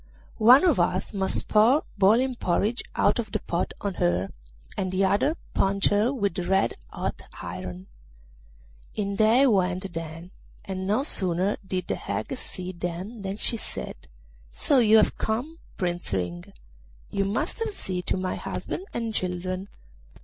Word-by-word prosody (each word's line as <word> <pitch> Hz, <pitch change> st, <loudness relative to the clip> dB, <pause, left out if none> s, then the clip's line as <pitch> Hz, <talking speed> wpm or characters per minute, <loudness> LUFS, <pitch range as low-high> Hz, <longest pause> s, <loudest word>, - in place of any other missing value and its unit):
One 245 Hz, +7 st, +8 dB
of 335 Hz, -, +4 dB
us 185 Hz, +3 st, 0 dB
must 190 Hz, -1 st, +1 dB
pour 230 Hz, +8 st, +5 dB
boiling 230 Hz, +7 st, +4 dB
porridge 215 Hz, +2 st, 0 dB
out -, -, +3 dB
of -, -, -3 dB
the -, -, 0 dB
pot -, -, -2 dB
on 200 Hz, -2 st, -2 dB
her, 85 Hz, +2 st, +1 dB, 0.5 s
and 185 Hz, -1 st, -2 dB
the 190 Hz, +1 st, +2 dB
other 205 Hz, -, +2 dB, 0.2 s
punch 195 Hz, 0 st, +2 dB
her 210 Hz, +5 st, +2 dB
with 200 Hz, -8 st, -1 dB
red 190 Hz, +2 st, +2 dB, 0.2 s
hot -, -, -4 dB, 0.2 s
iron.' 90 Hz, +1 st, -6 dB, 1.1 s
In 200 Hz, -1 st, -2 dB
they 225 Hz, +6 st, +5 dB
went 190 Hz, -5 st, +1 dB
then, 165 Hz, +2 st, -6 dB, 0.3 s
and 190 Hz, -1 st, -4 dB
no 215 Hz, +7 st, +2 dB
sooner 190 Hz, -, +2 dB
did 185 Hz, -2 st, -3 dB
the -, -, -1 dB
hag 100 Hz, +2 st, -3 dB
see 185 Hz, 0 st, -6 dB
them 180 Hz, +5 st, -5 dB
than 195 Hz, +1 st, -4 dB
she 230 Hz, -, +2 dB
said, 70 Hz, -, -7 dB, 0.4 s
'So 265 Hz, -, +2 dB
you 220 Hz, -2 st, +6 dB
have 215 Hz, -, +3 dB
come, 260 Hz, +10 st, -2 dB, 0.2 s
Prince 175 Hz, -, -2 dB
Ring; 90 Hz, -2 st, -3 dB, 0.6 s
you 200 Hz, -, +1 dB
must 200 Hz, -, -1 dB
have 455 Hz, -1 st, -1 dB
seen 185 Hz, -, -3 dB
to -, -, +1 dB
my 185 Hz, 0 st, -2 dB
husband 380 Hz, -, -5 dB
and 230 Hz, -1 st, -2 dB
children. 185 Hz, +1 st, -2 dB
195 Hz, 155 wpm, -26 LUFS, 180-220 Hz, 1.1 s, One